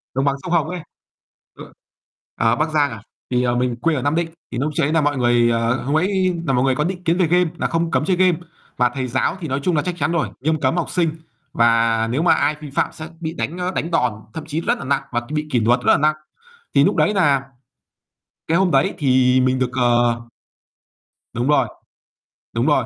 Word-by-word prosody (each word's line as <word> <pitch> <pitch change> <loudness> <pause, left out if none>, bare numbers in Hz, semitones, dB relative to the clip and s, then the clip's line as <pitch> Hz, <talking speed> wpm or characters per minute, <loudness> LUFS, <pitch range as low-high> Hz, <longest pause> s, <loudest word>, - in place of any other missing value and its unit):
Đồng 135 - +1
bằng 140 -1 +2
sông 180 - -5
Hồng 160 -3 +2
ấy. 180 0 -4 0.8
Ờ. - - -11 0.6
Ờ, 115 0 +2
Bắc 155 +3 0
Giang 150 -2 +1
à? 110 -2 -8 0.3
Thì, 125 0 +2
ờ, 120 -1 +1
mình 125 -1 0
quê 155 +7 0
ở 130 - -2
Nam 145 +4 0
Định. 170 0 0 0.2
Thì - - -4
lúc 150 +5 -1
ch - - +1
ấy 145 - +1
là 160 - +3
mọi 145 -1 0
người, 120 -1 +3
ờ 115 +2 0
hôm 145 +4 +1
ấy 185 +1 +1
là 135 - +2
mọi 125 - +2
người 135 -1 +2
có 150 - 0
định 180 +2 -4
kiến 170 +1 +1
về 180 - +2
game 180 +1 +2
nà - - 0
không 165 0 -1
cấm - - +1
chơi 185 +1 +2
game. 185 -3 +3 0.4
Và 125 -1 +3
thầy 130 +1 -4
giáo 130 +8 -1
thì 165 - -5
nói 135 0 -1
chung 180 +1 +1
là 150 - +2
chắc 180 +2 -3
chắn 150 0 0
rồi, 170 -2 0
nghiêm 155 +3 0
cấm 165 - +1
học 175 - -1
sinh, 170 -3 +1 0.4
và 115 -1 +3
nếu 135 +5 0
mà 170 - +5
ai 150 +1 +1
vi 150 - -8
phạm - - 0
sẽ 155 - -8
bị 160 -1 -4
đánh, 170 0 -4
ơ, 180 0 -2
đánh 165 - -2
đòn, 125 -8 +1 0.2
thậm 160 - -6
chí 160 +1 -3
rất - - 0
nà - - -7
nặng 140 +1 +1
và 120 -1 0
bị 150 0 -2
kỷ 125 - +2
luật 120 +3 +3
rất - - +3
là - - +5
nặng. 155 +1 +2 0.6
Thì - - +5
lúc - - +2
đấy 210 - +2
nà 145 -8 +3 1.1
cái 165 - +2
hôm 190 -1 +2
đấy 135 -1 +2
thì 130 -2 +3
mình 130 0 +1
được, 130 -1 0
ờ 120 -1 +2 1.1
Đúng 120 +2 -1
rồi, 140 -4 +3 0.9
đúng 115 +2 0
rồi. 145 -5 +3
145 Hz, 245 wpm, -20 LUFS, 125-165 Hz, 1.1 s, mà